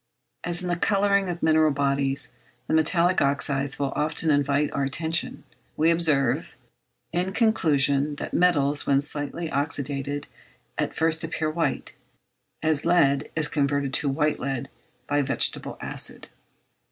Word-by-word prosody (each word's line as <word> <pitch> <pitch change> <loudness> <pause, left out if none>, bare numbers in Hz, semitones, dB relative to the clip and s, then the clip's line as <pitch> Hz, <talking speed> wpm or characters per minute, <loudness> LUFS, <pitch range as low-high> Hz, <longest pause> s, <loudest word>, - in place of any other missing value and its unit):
As 175 +1 0
in - - -3
the 175 - 0
colouring 200 +1 +2
of 175 -1 -5
mineral 155 -1 +4
bodies 140 -1 -1 0.3
the - - -3
metallic 170 +3 +3
oxydes 140 0 +1
will 140 -1 -2
often 155 +1 0
invite 145 0 +1
our 140 - -2
attention, 160 +5 -2 0.3
we 160 +2 +4
observe, 150 -7 +1 0.6
in 180 +2 -1
conclusion, 150 - +2
that - - -6
metals, 145 -5 +2
when 140 -1 +4
slightly 145 +3 -2
oxydated, 145 0 -2 0.5
at - - -2
first 160 0 +2
appear 160 -1 -2
white, 165 +1 -2 0.7
as 155 -2 +1
lead 145 -5 +2
is 155 -2 +2
converted 140 -2 -1
to 145 0 +1
white 150 +2 0
lead 135 -1 -4 0.3
by 145 +2 +1
vegetable 135 0 0
acid. - - -5
150 Hz, 135 wpm, -25 LUFS, 140-165 Hz, 0.7 s, mineral